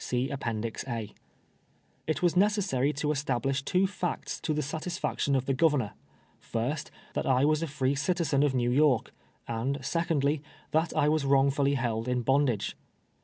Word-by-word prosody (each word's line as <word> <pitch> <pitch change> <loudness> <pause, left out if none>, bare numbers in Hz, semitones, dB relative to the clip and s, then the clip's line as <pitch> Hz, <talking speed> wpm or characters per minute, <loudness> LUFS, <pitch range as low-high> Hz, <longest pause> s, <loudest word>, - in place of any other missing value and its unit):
'■'" 120 -3 -3 1.0
It 155 +1 -1
was 175 -1 +3
necessary 190 - +2
to 150 +1 -1
establish 135 -2 0
two 180 +7 +2
facts 185 -2 -3
to - - -1
the 150 0 0
satis 160 +5 -4
faction 140 - 0
of 130 -1 0
tlie 135 - 0
Governor: 145 -8 +2 0.5
First, 140 +7 -3 0.2
that - - -2
I 130 +1 +4
was 155 +1 +2
a 165 - -1
free 135 -2 0
citi 170 +5 0
zen 140 -3 +2
of 145 -2 +2
Xew 120 -1 +1
York; 140 -4 +3 0.3
and 120 +4 -1
secondly, 155 -4 +1 0.3
that 160 +2 +1
I 145 - +4
was 155 -1 +2
wrong 140 0 +4
fully 140 0 +1
held 115 -3 -1
in 125 -1 0
bondage. 135 -4 +1
140 Hz, 165 wpm, -29 LUFS, 125-155 Hz, 1.0 s, I